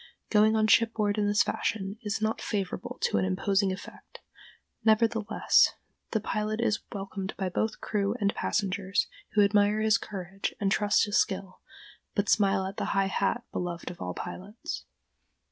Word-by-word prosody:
Going 215 Hz, 0 st, +5 dB
on 215 Hz, 0 st, +3 dB
shipboard 220 Hz, -2 st, +3 dB
in 205 Hz, -, +2 dB
this 205 Hz, +1 st, +4 dB
fashion 200 Hz, 0 st, -2 dB
is 215 Hz, -1 st, -2 dB
not 220 Hz, +1 st, 0 dB
favorable 195 Hz, -3 st, -3 dB
to 100 Hz, -, +2 dB
an -, -, +1 dB
imposing 195 Hz, -, +1 dB
effect; 190 Hz, +2 st, -10 dB, 0.6 s
nevertheless, 220 Hz, -1 st, +3 dB, 0.3 s
the 220 Hz, -, 0 dB
pilot 215 Hz, +1 st, -2 dB
is 215 Hz, -2 st, +1 dB
welcomed 195 Hz, -1 st, -5 dB
by 190 Hz, -2 st, -1 dB
both 220 Hz, +4 st, -2 dB
crew 205 Hz, 0 st, 0 dB
and 200 Hz, -1 st, +1 dB
passengers, 195 Hz, -1 st, 0 dB, 0.3 s
who 210 Hz, -, +5 dB
admire 205 Hz, +1 st, +3 dB
his 220 Hz, +1 st, +3 dB
courage 195 Hz, -1 st, -5 dB
and 195 Hz, -1 st, +1 dB
trust 205 Hz, +1 st, +3 dB
his 205 Hz, -1 st, +2 dB
skill, 190 Hz, -3 st, -2 dB, 0.6 s
but 200 Hz, -1 st, 0 dB
smile 195 Hz, -2 st, +3 dB
at 195 Hz, +1 st, -6 dB
the -, -, -1 dB
high 195 Hz, -, +4 dB
hat 215 Hz, +4 st, 0 dB
beloved 175 Hz, -1 st, -4 dB
of 175 Hz, -, -12 dB
all 90 Hz, 0 st, -4 dB
pilots. 205 Hz, +5 st, -6 dB
205 Hz, 160 wpm, -28 LUFS, 195-215 Hz, 0.6 s, Going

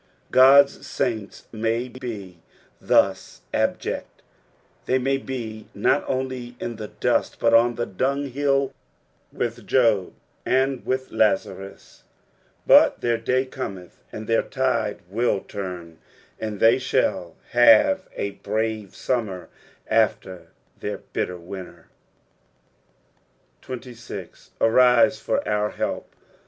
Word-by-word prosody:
God's 140 Hz, +2 st, +6 dB
saints 110 Hz, -4 st, -3 dB
may 115 Hz, +2 st, -1 dB
be 110 Hz, -9 st, -8 dB, 0.4 s
thus -, -, +1 dB
abject, -, -, -2 dB, 0.6 s
they 130 Hz, -, +3 dB
may 135 Hz, +1 st, +1 dB
be 115 Hz, -5 st, -6 dB
nut 135 Hz, +7 st, +2 dB
only 130 Hz, -2 st, -3 dB
in 120 Hz, -2 st, -5 dB
the 110 Hz, -1 st, -6 dB
dust, -, -, -1 dB
but 115 Hz, 0 st, +3 dB
un 120 Hz, +1 st, +5 dB
the 120 Hz, -, -2 dB
dunghill 140 Hz, +4 st, 0 dB, 0.6 s
with 120 Hz, 0 st, -4 dB
Job 115 Hz, -8 st, +3 dB, 0.3 s
and 130 Hz, 0 st, +1 dB, 0.3 s
Lazarus, 100 Hz, -2 st, -1 dB, 0.6 s
but -, -, +6 dB
their 120 Hz, -1 st, +1 dB
da; 130 Hz, +3 st, +1 dB
cometh, 95 Hz, -9 st, -8 dB
and 110 Hz, -, -7 dB
their 115 Hz, +1 st, +2 dB
tide 130 Hz, -6 st, -1 dB
will 105 Hz, +1 st, 0 dB
turn, 90 Hz, -5 st, -7 dB, 0.4 s
and 105 Hz, -2 st, -4 dB
they 115 Hz, +3 st, +5 dB
shall 130 Hz, -9 st, -1 dB, 0.2 s
have 120 Hz, -, +5 dB
a 100 Hz, -, -2 dB
brave 110 Hz, 0 st, -3 dB
summer 100 Hz, -9 st, -3 dB, 0.4 s
after 95 Hz, -6 st, 0 dB, 0.3 s
their 105 Hz, -1 st, -4 dB
bitter 90 Hz, -1 st, -4 dB
winter. 90 Hz, +1 st, -10 dB, 1.7 s
36. 125 Hz, -2 st, -9 dB
"ArUe 125 Hz, +3 st, +5 dB
for -, -, -1 dB
our 105 Hz, 0 st, 0 dB
kelp." -, -, -3 dB
115 Hz, 105 wpm, -23 LUFS, 105-130 Hz, 1.7 s, God's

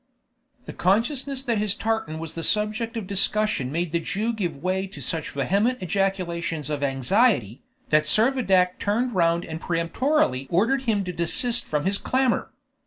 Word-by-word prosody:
The -, -, -8 dB
consciousness 260 Hz, -, 0 dB
that 235 Hz, -5 st, 0 dB
his 210 Hz, -1 st, +2 dB
tartan 220 Hz, -9 st, -2 dB
was 160 Hz, -1 st, -6 dB
the 165 Hz, -, -4 dB
subject 215 Hz, +5 st, 0 dB
of 220 Hz, -, -4 dB
discussion 195 Hz, -7 st, +1 dB
made 170 Hz, +1 st, -2 dB
the 170 Hz, -, +1 dB
Jew 215 Hz, +7 st, -2 dB
give 175 Hz, -9 st, -3 dB
way 185 Hz, +5 st, -2 dB
to 185 Hz, -, -12 dB
such 160 Hz, +4 st, -3 dB
vehement 200 Hz, -, 0 dB
ejaculations 175 Hz, -5 st, -2 dB
of 145 Hz, -1 st, -2 dB
anxiety, 135 Hz, -, +1 dB, 0.3 s
that 155 Hz, 0 st, +3 dB
Servadac 195 Hz, -, +3 dB
turned 235 Hz, +5 st, 0 dB
round 170 Hz, -1 st, +1 dB
and 160 Hz, +1 st, -7 dB
peremptorily 170 Hz, -, 0 dB
ordered 230 Hz, +10 st, +2 dB
him 210 Hz, -4 st, +1 dB
to 180 Hz, -1 st, -5 dB
desist 230 Hz, +9 st, +1 dB
from 150 Hz, +1 st, -2 dB
his 195 Hz, +1 st, +1 dB
clamor. 260 Hz, -1 st, 0 dB
190 Hz, 160 wpm, -24 LUFS, 165-225 Hz, 0.3 s, that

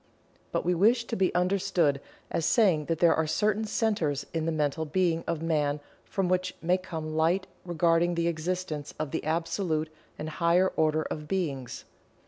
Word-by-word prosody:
But -, -, -1 dB
we 180 Hz, -, +3 dB
wish 230 Hz, +7 st, +3 dB
to 230 Hz, -, -3 dB
be 190 Hz, -2 st, +2 dB
understood 180 Hz, -6 st, +2 dB, 0.3 s
as 165 Hz, -, -1 dB
saying 175 Hz, -6 st, +3 dB
that 165 Hz, +1 st, -1 dB
there 170 Hz, +1 st, +5 dB
are 160 Hz, -1 st, 0 dB
certain 210 Hz, +6 st, +1 dB
centers 200 Hz, -, 0 dB
in 165 Hz, -1 st, -1 dB
the -, -, +1 dB
mental 150 Hz, 0 st, 0 dB
being 165 Hz, +1 st, 0 dB
of 165 Hz, -1 st, -2 dB
Man 150 Hz, -3 st, +1 dB, 0.3 s
from 195 Hz, -2 st, -1 dB
which 185 Hz, 0 st, 0 dB
may 180 Hz, +3 st, +1 dB
come 160 Hz, -4 st, -5 dB
light 170 Hz, +4 st, +2 dB, 0.2 s
regarding 170 Hz, 0 st, +2 dB
the 170 Hz, 0 st, +1 dB
existence 165 Hz, -2 st, -3 dB
of 155 Hz, -2 st, -3 dB
the -, -, -2 dB
Absolute 165 Hz, 0 st, -1 dB, 0.3 s
and 155 Hz, -, -5 dB
higher 170 Hz, +3 st, +3 dB
order 155 Hz, 0 st, +1 dB
of 150 Hz, -1 st, -5 dB
Beings. 145 Hz, -9 st, -3 dB
165 Hz, 170 wpm, -28 LUFS, 155-185 Hz, 0.3 s, there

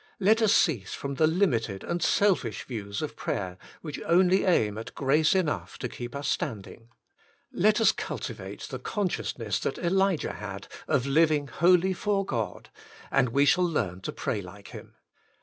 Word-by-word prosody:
Let 215 Hz, +3 st, +4 dB
us 220 Hz, -2 st, +4 dB
cease 140 Hz, -, +2 dB
from 140 Hz, +1 st, -4 dB
the 155 Hz, +3 st, +3 dB
limited 120 Hz, -, 0 dB
and 175 Hz, 0 st, -3 dB
selfish 185 Hz, -, +2 dB
views 100 Hz, -5 st, -5 dB
of -, -, -5 dB
prayer, 95 Hz, -2 st, -3 dB, 0.2 s
which 150 Hz, -4 st, -6 dB
only 180 Hz, +3 st, +4 dB
aim 110 Hz, -, +2 dB
at 115 Hz, -, -9 dB
grace 150 Hz, +5 st, +3 dB
enough 175 Hz, -6 st, -1 dB
to 125 Hz, -, -3 dB
keep 120 Hz, +2 st, -7 dB
us 140 Hz, +1 st, -3 dB
standing. 115 Hz, -1 st, -4 dB, 0.6 s
Let 215 Hz, +4 st, +3 dB
us 225 Hz, -, +5 dB
culti -, -, -4 dB
vate -, -, -9 dB
the -, -, -6 dB
consciousness 150 Hz, -, -2 dB
that -, -, -2 dB
Elijah 190 Hz, -1 st, +1 dB
had 100 Hz, -1 st, -7 dB, 0.2 s
of 130 Hz, -2 st, +1 dB
living 150 Hz, 0 st, +2 dB
wholly 180 Hz, +2 st, +3 dB
for 195 Hz, +1 st, 0 dB
God, 115 Hz, -, -4 dB, 0.4 s
and 125 Hz, -, +3 dB
we 140 Hz, +5 st, +3 dB
shall 180 Hz, +5 st, +4 dB
learn 100 Hz, -, -1 dB
to -, -, -4 dB
pray -, -, -3 dB
like -, -, -12 dB
him. -, -, -11 dB
150 Hz, 165 wpm, -27 LUFS, 115-185 Hz, 0.6 s, us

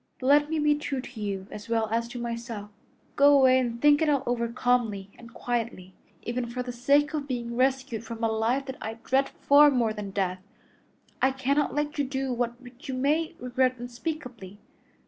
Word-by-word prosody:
But 255 Hz, -, -6 dB
let 290 Hz, +2 st, +5 dB
me 320 Hz, -, -1 dB
be 300 Hz, -1 st, +3 dB
true 290 Hz, -2 st, -3 dB
to 250 Hz, -3 st, -8 dB
you 195 Hz, -2 st, -3 dB
as 210 Hz, +2 st, -9 dB
well 225 Hz, -1 st, +1 dB
as 230 Hz, +1 st, 0 dB
to 245 Hz, +1 st, -8 dB
myself. 230 Hz, -3 st, -5 dB, 0.4 s
Go 285 Hz, 0 st, +6 dB
away 260 Hz, -1 st, +5 dB
and 235 Hz, -2 st, -2 dB
think 290 Hz, +2 st, +5 dB
it 315 Hz, -, +3 dB
all 280 Hz, -2 st, +2 dB
over 235 Hz, -1 st, 0 dB
calmly 230 Hz, -5 st, 0 dB
and 235 Hz, -1 st, -14 dB
quietly. 230 Hz, -6 st, -4 dB, 0.3 s
Even 240 Hz, 0 st, -3 dB
for 250 Hz, +1 st, -4 dB
the 250 Hz, -, -5 dB
sake 280 Hz, +5 st, +2 dB
of 295 Hz, -2 st, -3 dB
being 235 Hz, -3 st, -4 dB
rescued 255 Hz, -3 st, 0 dB
from 230 Hz, 0 st, -7 dB
a -, -, +4 dB
life 225 Hz, +5 st, 0 dB
that 265 Hz, -1 st, -6 dB
I 220 Hz, +1 st, -4 dB
dread 265 Hz, +4 st, 0 dB
far 290 Hz, +1 st, +5 dB
more 240 Hz, -5 st, +1 dB
than 210 Hz, -2 st, -6 dB
death, 185 Hz, -2 st, -2 dB, 0.8 s
I 265 Hz, -, +5 dB
cannot 270 Hz, +2 st, 0 dB
let 295 Hz, 0 st, -2 dB
you -, -, +3 dB
do 265 Hz, -1 st, -2 dB
that 240 Hz, 0 st, -2 dB
which 255 Hz, +4 st, -14 dB
you 260 Hz, -, -2 dB
may 305 Hz, +5 st, 0 dB
regret 255 Hz, +1 st, 0 dB
unspeakably. 240 Hz, -, -6 dB
245 Hz, 200 wpm, -27 LUFS, 230-275 Hz, 0.8 s, Go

